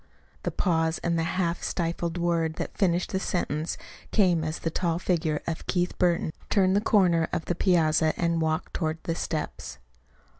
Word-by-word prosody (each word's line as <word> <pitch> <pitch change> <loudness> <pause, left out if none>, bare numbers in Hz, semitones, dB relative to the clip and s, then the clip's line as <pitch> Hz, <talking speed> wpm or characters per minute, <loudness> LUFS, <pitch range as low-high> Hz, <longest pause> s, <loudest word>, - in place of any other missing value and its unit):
The - - -1
pause, 160 -3 +1
and 170 -1 +1
the 165 +3 -1
half 175 -2 0
stifled 170 0 -2
word 170 -2 0
that - - -5
finished 180 0 +1
the 190 - 0
sentence 160 -4 -2 0.3
came 180 -6 +3
as 155 +1 -2
the 165 - -3
tall 170 0 0
figure 165 -4 0
of 165 -1 -4
Keith 180 -1 0
Burton 170 -3 +2 0.2
turned 190 -1 +3
the 205 - +3
corner 175 -7 +3
of 160 - -2
the - - 0
piazza 160 -3 +3
and 170 -1 +1
walked 160 0 -1
toward 160 -2 -1
the 165 - -1
steps. 160 - -4
170 Hz, 175 wpm, -27 LUFS, 160-180 Hz, 0.3 s, came